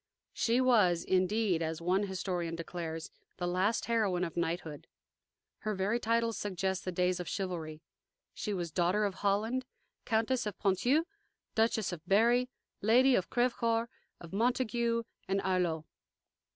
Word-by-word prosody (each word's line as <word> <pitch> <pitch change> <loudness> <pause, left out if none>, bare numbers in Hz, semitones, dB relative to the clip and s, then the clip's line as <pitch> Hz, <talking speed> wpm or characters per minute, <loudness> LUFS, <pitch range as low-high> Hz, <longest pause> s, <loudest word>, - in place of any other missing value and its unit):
She 235 +2 +2
was, 210 -10 +4
indeed, 185 -1 +1
as 160 0 -2
one 185 +4 +1
historian 180 -3 -2
declares, 165 -1 -5 0.3
the 180 - -2
last 185 +5 +1
heroine 210 -6 +1
of 170 - -4
knighthood. 165 -3 -3 0.7
Her 215 -1 -2
very 200 +5 0
titles 230 0 +1
suggest 190 -1 -2
the 185 - -1
days 180 0 +1
of 180 - -5
chivalry. 165 -5 -4 0.5
She 210 - -4
was 175 -4 -3
Daughter 185 +5 +2
of 200 - -1
Holland, 215 +7 0 0.4
Countess 225 +1 +1
of 205 - -5
Ponthieu, 245 - +2 0.5
Duchess 220 -2 +1
of 175 -3 -6
Berry, 235 +6 +4 0.3
Lady 250 +5 +5
of 190 -7 +1
Crevecoeur, 235 -1 +1 0.3
of 170 +1 -11
Montague 235 +1 +1 0.2
and 195 +1 +1
Arloeux. 180 -4 0
195 Hz, 140 wpm, -32 LUFS, 175-230 Hz, 0.7 s, Lady